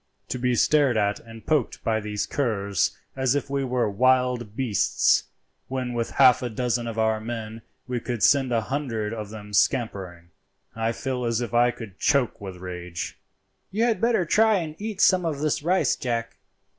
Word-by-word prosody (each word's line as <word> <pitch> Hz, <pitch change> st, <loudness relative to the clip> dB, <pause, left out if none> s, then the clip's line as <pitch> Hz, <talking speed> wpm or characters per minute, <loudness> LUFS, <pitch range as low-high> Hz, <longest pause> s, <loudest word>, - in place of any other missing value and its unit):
To 125 Hz, -, -3 dB
be 125 Hz, 0 st, +1 dB
stared 140 Hz, -2 st, +3 dB
at 100 Hz, -1 st, +1 dB
and 115 Hz, -1 st, -13 dB
poked 150 Hz, -6 st, 0 dB
by 110 Hz, -1 st, +1 dB
these 105 Hz, -1 st, -3 dB
curs 100 Hz, -8 st, -1 dB, 0.2 s
as 130 Hz, 0 st, +1 dB
if 145 Hz, -1 st, -2 dB
we 140 Hz, -1 st, 0 dB
were 125 Hz, -3 st, 0 dB
wild 125 Hz, 0 st, +1 dB
beasts, 115 Hz, -6 st, +2 dB, 0.4 s
when 130 Hz, -2 st, -3 dB
with 115 Hz, -1 st, -2 dB
half 130 Hz, -3 st, +5 dB
a 125 Hz, -, -2 dB
dozen 120 Hz, +1 st, -1 dB
of 115 Hz, -1 st, -5 dB
our 110 Hz, -1 st, +2 dB
men 115 Hz, 0 st, -6 dB, 0.3 s
we 125 Hz, -1 st, -2 dB
could 120 Hz, -1 st, -4 dB
send 135 Hz, -3 st, +4 dB
a 115 Hz, -1 st, +2 dB
hundred 115 Hz, -4 st, -3 dB
of 105 Hz, -2 st, -6 dB
them 105 Hz, -1 st, -10 dB
scampering, 95 Hz, -8 st, 0 dB, 0.5 s
I 115 Hz, 0 st, 0 dB
feel 125 Hz, +1 st, -3 dB
as 115 Hz, -1 st, 0 dB
if 120 Hz, -1 st, -4 dB
I 120 Hz, +1 st, +5 dB
could 110 Hz, -6 st, -8 dB
choke 140 Hz, -6 st, +1 dB
with 95 Hz, -2 st, -7 dB
rage." 90 Hz, -1 st, -6 dB, 0.5 s
"You 215 Hz, +4 st, 0 dB
had 235 Hz, -2 st, +1 dB
better 230 Hz, -6 st, +2 dB
try 220 Hz, +6 st, +4 dB
and 160 Hz, -5 st, -3 dB
eat 210 Hz, -2 st, -4 dB
some 185 Hz, -1 st, +5 dB
of 160 Hz, -4 st, -1 dB
this 150 Hz, -1 st, 0 dB
rice, 180 Hz, +5 st, +2 dB
Jack. 115 Hz, -2 st, -3 dB
120 Hz, 180 wpm, -25 LUFS, 110-135 Hz, 0.5 s, half